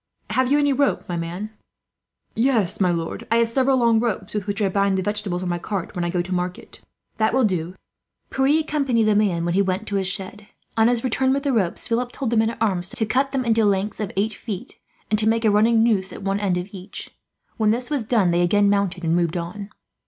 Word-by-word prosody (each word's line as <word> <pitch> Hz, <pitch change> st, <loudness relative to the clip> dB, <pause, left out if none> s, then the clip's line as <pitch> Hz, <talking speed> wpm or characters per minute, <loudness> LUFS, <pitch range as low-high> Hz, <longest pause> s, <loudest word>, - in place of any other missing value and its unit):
"Have 260 Hz, 0 st, +1 dB
you 290 Hz, -, +5 dB
any 285 Hz, -1 st, +3 dB
rope, 280 Hz, +1 st, 0 dB
my 175 Hz, -, -3 dB
man?" 175 Hz, +6 st, -4 dB, 0.8 s
"Yes, 225 Hz, -7 st, +1 dB
my 185 Hz, -, +4 dB
lord, 165 Hz, -1 st, -3 dB
I 230 Hz, -, +2 dB
have 230 Hz, 0 st, +3 dB
several 265 Hz, +2 st, +2 dB
long 235 Hz, -2 st, +3 dB
ropes, 220 Hz, -4 st, -2 dB
with 210 Hz, -2 st, -3 dB
which 205 Hz, -1 st, -2 dB
I 205 Hz, -, +2 dB
bind 200 Hz, 0 st, +1 dB
the 190 Hz, -, -1 dB
vegetables 205 Hz, -3 st, -1 dB
on 180 Hz, -, -2 dB
my 175 Hz, 0 st, -1 dB
cart 190 Hz, -1 st, -4 dB
when 175 Hz, -, -2 dB
I 175 Hz, -, -1 dB
go 175 Hz, 0 st, 0 dB
to 185 Hz, +1 st, -5 dB
market." 180 Hz, 0 st, -4 dB, 0.4 s
"That 220 Hz, +2 st, +1 dB
will 260 Hz, -, +3 dB
do. 200 Hz, -5 st, +2 dB
Bring 160 Hz, -, -4 dB
them 180 Hz, +2 st, -12 dB
at -, -, -49 dB
once." -, -, -21 dB, 0.2 s
Pierre 315 Hz, +1 st, +4 dB
accompanied 275 Hz, -7 st, +1 dB
the 215 Hz, -1 st, +3 dB
man 190 Hz, -5 st, +1 dB
when 170 Hz, -, 0 dB
he 195 Hz, -, +3 dB
went 190 Hz, +2 st, -1 dB
to 200 Hz, -, 0 dB
his 190 Hz, -1 st, -1 dB
shed. 195 Hz, +2 st, -4 dB, 0.3 s
On 225 Hz, 0 st, +4 dB
his 240 Hz, -1 st, +1 dB
return 260 Hz, +1 st, +1 dB
with 275 Hz, 0 st, -1 dB
the 280 Hz, -2 st, +1 dB
ropes, 190 Hz, -7 st, 0 dB
Philip 245 Hz, +1 st, -1 dB
told 260 Hz, -5 st, -3 dB
the 235 Hz, -, +2 dB
men 220 Hz, 0 st, +3 dB
at 230 Hz, -, -6 dB
arms 190 Hz, -5 st, +1 dB
to 220 Hz, -, -1 dB
cut 265 Hz, +5 st, +1 dB
them 270 Hz, -2 st, -2 dB
into 225 Hz, -1 st, +3 dB
lengths 200 Hz, 0 st, 0 dB
of 210 Hz, -3 st, -3 dB
eight 215 Hz, +3 st, +1 dB
feet, 200 Hz, -3 st, -7 dB, 0.3 s
and 215 Hz, -, +3 dB
to 220 Hz, 0 st, +3 dB
make 225 Hz, 0 st, +1 dB
a 215 Hz, -, +5 dB
running 225 Hz, +2 st, +4 dB
noose 200 Hz, -5 st, +1 dB
at -, -, -9 dB
one 195 Hz, +1 st, 0 dB
end 195 Hz, -3 st, 0 dB
of 180 Hz, +2 st, -4 dB
each. 190 Hz, -1 st, -8 dB, 0.5 s
When 215 Hz, -1 st, +2 dB
this 245 Hz, +5 st, -1 dB
was 285 Hz, -5 st, 0 dB
done, 210 Hz, -5 st, +2 dB
they 175 Hz, +1 st, +2 dB
again 200 Hz, +3 st, +3 dB
mounted 195 Hz, -3 st, 0 dB
and 165 Hz, 0 st, +1 dB
moved 175 Hz, -1 st, 0 dB
on. 185 Hz, +4 st, -6 dB
210 Hz, 255 wpm, -22 LUFS, 185-230 Hz, 0.8 s, you